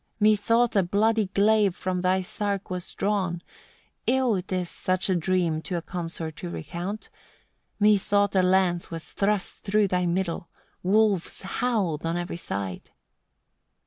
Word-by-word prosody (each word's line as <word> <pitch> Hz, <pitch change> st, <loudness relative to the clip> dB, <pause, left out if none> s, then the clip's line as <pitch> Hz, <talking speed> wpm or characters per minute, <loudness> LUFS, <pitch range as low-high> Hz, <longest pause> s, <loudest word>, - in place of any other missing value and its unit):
23. 215 Hz, 0 st, +5 dB
"Methought 230 Hz, +3 st, +2 dB
a 200 Hz, -, +5 dB
bloody 210 Hz, +4 st, +2 dB
glave 200 Hz, 0 st, +3 dB
from 185 Hz, -1 st, -2 dB
thy 185 Hz, +1 st, +2 dB
sark 200 Hz, +1 st, -3 dB
was 180 Hz, 0 st, -4 dB
drawn 190 Hz, -4 st, 0 dB, 0.7 s
ill 250 Hz, -6 st, +2 dB
'tis 180 Hz, -1 st, -3 dB
such 185 Hz, +2 st, -1 dB
a -, -, +3 dB
dream 175 Hz, -2 st, +1 dB
to 180 Hz, +1 st, -3 dB
a -, -, -3 dB
consort 165 Hz, -3 st, -5 dB
to 175 Hz, -, -5 dB
recount 175 Hz, +6 st, -5 dB, 0.7 s
methought 205 Hz, -1 st, +3 dB
a 190 Hz, -, +5 dB
lance 180 Hz, -1 st, +2 dB
was 165 Hz, -1 st, -7 dB
thrust 200 Hz, -1 st, 0 dB
through 210 Hz, 0 st, +2 dB
thy 180 Hz, -1 st, 0 dB
middle: 170 Hz, -1 st, -2 dB, 0.3 s
wolves 200 Hz, -1 st, +2 dB
howled 195 Hz, -6 st, -1 dB
on 165 Hz, +1 st, -1 dB
every 175 Hz, 0 st, -4 dB
side." 100 Hz, -, -5 dB
185 Hz, 145 wpm, -26 LUFS, 175-205 Hz, 0.7 s, 23